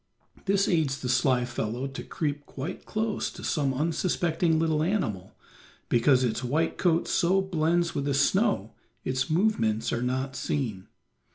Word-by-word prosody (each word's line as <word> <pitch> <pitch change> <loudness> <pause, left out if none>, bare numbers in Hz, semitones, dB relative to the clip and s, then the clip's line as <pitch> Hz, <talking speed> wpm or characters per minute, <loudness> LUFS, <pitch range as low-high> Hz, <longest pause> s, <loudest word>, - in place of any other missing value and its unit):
This 200 0 +2
aids 155 -6 +1
the 125 - -4
sly 125 0 +3
fellow 120 +1 -3
to 135 -1 -6
creep 145 -2 -3
quite 140 +6 -6
close 215 0 -1
to - - -11
some 140 -4 0
unsuspecting 165 +2 +1
little 160 -1 +1
animal, 135 - -1 0.5
because 125 +2 +4
its 120 0 -1
white 155 +7 0
coat 170 -2 +2
so 185 +2 +3
blends 170 -2 +1
with 140 -4 -2
the 140 -1 0
snow 165 - +2 0.3
its 130 0 -1
movements 155 - +1
are 115 - -1
not 130 +2 -2
seen. 115 -13 -3
145 Hz, 150 wpm, -27 LUFS, 125-170 Hz, 0.5 s, because